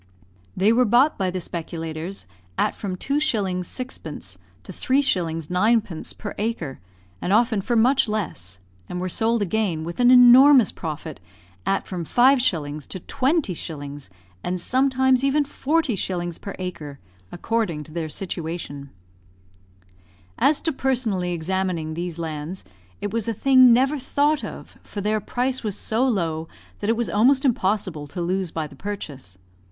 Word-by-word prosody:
They 205 Hz, +4 st, +4 dB
were 250 Hz, +2 st, +4 dB
bought 245 Hz, +7 st, +4 dB
by 190 Hz, -1 st, +1 dB
the 185 Hz, +1 st, -3 dB
speculators 165 Hz, +1 st, -5 dB, 0.3 s
at -, -, +1 dB
from 195 Hz, -3 st, -4 dB
2s. 280 Hz, +10 st, -1 dB, 0.4 s
6d. 165 Hz, -, -6 dB, 0.3 s
to -, -, -9 dB
3s. 180 Hz, -, 0 dB
9d. 195 Hz, -2 st, 0 dB
per 205 Hz, -, -6 dB
acre, 205 Hz, -, -3 dB, 0.4 s
and 180 Hz, -, -2 dB
often 220 Hz, -1 st, +3 dB
for 240 Hz, +5 st, -1 dB
much 250 Hz, +2 st, +4 dB
less, 125 Hz, -, -4 dB, 0.3 s
and 180 Hz, -, -4 dB
were 185 Hz, -, -2 dB
sold 225 Hz, +4 st, +1 dB
again, 195 Hz, -5 st, -1 dB
with 170 Hz, +5 st, -6 dB
an 245 Hz, 0 st, +5 dB
enormous 250 Hz, 0 st, +8 dB
profit, 155 Hz, -, -6 dB, 0.5 s
at 195 Hz, -, +1 dB
from 180 Hz, -3 st, -4 dB
5s. 180 Hz, -, +2 dB
to 185 Hz, -, -6 dB
20s., 170 Hz, -, -2 dB, 0.3 s
and 180 Hz, 0 st, -2 dB
sometimes 260 Hz, +3 st, +2 dB
even 280 Hz, +2 st, +3 dB
40s. 230 Hz, -, -1 dB
per 200 Hz, -, -6 dB
acre, 170 Hz, -6 st, -6 dB, 0.3 s
according 180 Hz, -6 st, -1 dB
to 155 Hz, -, -15 dB
their 160 Hz, -1 st, -3 dB
situation. 160 Hz, -5 st, -5 dB, 1.5 s
As 295 Hz, +1 st, +3 dB
to 325 Hz, -, 0 dB
personally 235 Hz, -10 st, 0 dB
examining 175 Hz, -1 st, -2 dB
these 170 Hz, 0 st, -4 dB
lands, 160 Hz, +2 st, -5 dB, 0.4 s
it 205 Hz, 0 st, -3 dB
was 230 Hz, -2 st, -1 dB
a 230 Hz, -, -1 dB
thing 255 Hz, +1 st, +6 dB
never 265 Hz, +5 st, +3 dB
thought 290 Hz, +3 st, +1 dB
of, -, -, -9 dB
for 205 Hz, -, -8 dB
their 210 Hz, +2 st, 0 dB
price 250 Hz, +5 st, -2 dB
was 210 Hz, -3 st, -2 dB
so 225 Hz, +3 st, 0 dB
low 165 Hz, -8 st, -1 dB, 0.3 s
that 205 Hz, -, -2 dB
it 225 Hz, -, +2 dB
was 235 Hz, -, 0 dB
almost 260 Hz, +7 st, +4 dB
impossible 190 Hz, -, 0 dB
to 160 Hz, -, -7 dB
lose 180 Hz, +1 st, -1 dB
by 160 Hz, -1 st, -3 dB
the 150 Hz, -, -12 dB
purchase. 145 Hz, -, -7 dB
195 Hz, 145 wpm, -23 LUFS, 165-245 Hz, 1.5 s, enormous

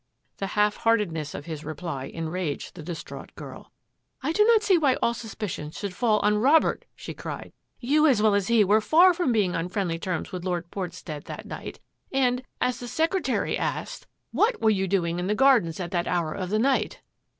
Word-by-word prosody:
The 195 Hz, -, -3 dB
half 210 Hz, 0 st, +3 dB
heartedness 185 Hz, -10 st, 0 dB
of 145 Hz, -, -7 dB
his 160 Hz, -2 st, -6 dB
reply 155 Hz, -3 st, -5 dB
enraged 165 Hz, -1 st, -4 dB
the 175 Hz, -, -9 dB
distraught 170 Hz, +1 st, -8 dB
girl. -, -, -10 dB, 0.3 s
" -, -, -51 dB
I 295 Hz, -, 0 dB
do 420 Hz, +6 st, +4 dB
not 450 Hz, -1 st, +5 dB
see 390 Hz, -, +4 dB
why 290 Hz, -6 st, +3 dB
all 235 Hz, -, +1 dB
suspicion 215 Hz, -9 st, -5 dB
should 195 Hz, +4 st, -5 dB
fall 220 Hz, +1 st, +2 dB
on 210 Hz, 0 st, +2 dB
Robert," 290 Hz, +7 st, +3 dB
she -, -, -8 dB
cried. -, -, -7 dB
" -, -, -48 dB
You, 300 Hz, +5 st, +3 dB
as 255 Hz, -7 st, +4 dB
well 215 Hz, -1 st, +4 dB
as 200 Hz, -2 st, +1 dB
he, 235 Hz, -2 st, +5 dB
were 210 Hz, +3 st, +4 dB
far 350 Hz, +10 st, +6 dB
from 335 Hz, -7 st, 0 dB
being 205 Hz, -6 st, +1 dB
on 165 Hz, +2 st, -2 dB
friendly 180 Hz, -4 st, -2 dB
terms 180 Hz, -1 st, -3 dB
with 180 Hz, -2 st, -5 dB
Lord 175 Hz, -2 st, -3 dB
Portstead 175 Hz, -5 st, -6 dB
that -, -, -8 dB
night, -, -, -8 dB, 0.3 s
and, 250 Hz, -2 st, +2 dB, 0.2 s
as 250 Hz, -, 0 dB
the 245 Hz, -, -7 dB
secretary 325 Hz, +9 st, 0 dB
asked, -, -, -4 dB
' -, -, -51 dB
What 460 Hz, +2 st, +2 dB
were 220 Hz, -, +4 dB
k -, -, +3 dB
ACCUSATIONS -, -, -1 dB
88 -, -, -2 dB
you 190 Hz, -, 0 dB
doing 175 Hz, -2 st, 0 dB
in 180 Hz, -, -2 dB
the 210 Hz, -, +1 dB
gardens 235 Hz, -11 st, +4 dB
at 175 Hz, -1 st, -4 dB
that 175 Hz, -1 st, -1 dB
hour 170 Hz, -3 st, 0 dB
of 185 Hz, -2 st, -4 dB
the 210 Hz, -, +1 dB
night?'" 265 Hz, +4 st, +1 dB
205 Hz, 220 wpm, -26 LUFS, 175-250 Hz, 0.3 s, far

